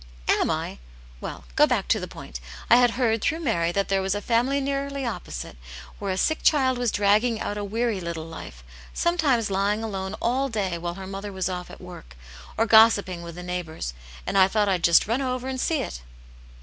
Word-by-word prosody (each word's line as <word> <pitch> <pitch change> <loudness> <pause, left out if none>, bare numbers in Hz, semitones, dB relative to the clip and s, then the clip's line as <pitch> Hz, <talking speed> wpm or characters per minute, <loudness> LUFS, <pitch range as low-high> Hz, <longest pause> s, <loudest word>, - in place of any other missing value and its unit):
"Am - - +3
I? - - -3 0.4
Well, - - -7
go - - +6
back - - 0
to - - +3
the - - -5
point. - - -9 0.3
I - - +9
had 245 -1 +5
heard, 225 -4 +2
through 325 +1 0
Mary, 170 - +1
that 200 +2 0
there 195 0 +1
was 190 +1 0
a - - -1
family 245 +6 +1
nearly 275 0 -2
opposite, 175 - -5 0.4
where 200 - -3
a 185 - -2
sick 315 +10 +1
child 260 -4 +3
was 245 -3 +1
dragging 215 +3 +2
out 205 - -3
a 205 - -3
weary 220 0 -1
little 170 -2 -4
life, 160 - -10 0.3
sometimes 285 - +1
lying 200 +3 +1
alone 190 -3 -4
all 260 +4 0
day 200 -6 -1
while 175 0 -4
her 190 0 -7
mother 195 +2 -6
was 190 -1 -2
off 180 -1 -5
at - - -11
work, 175 - -11 0.4
or 225 - +3
gossiping 220 -5 +5
with 170 -1 -8
the 180 - -7
neighbours, 170 - -4 0.3
and 195 +1 +1
I 190 - +7
thought 210 +1 +1
I'd 185 -3 0
just 170 -1 +6
run 230 +6 0
over 255 -1 -2
and 260 -1 -3
see 315 -4 +1
it." 60 - -7
205 Hz, 210 wpm, -25 LUFS, 180-245 Hz, 0.4 s, I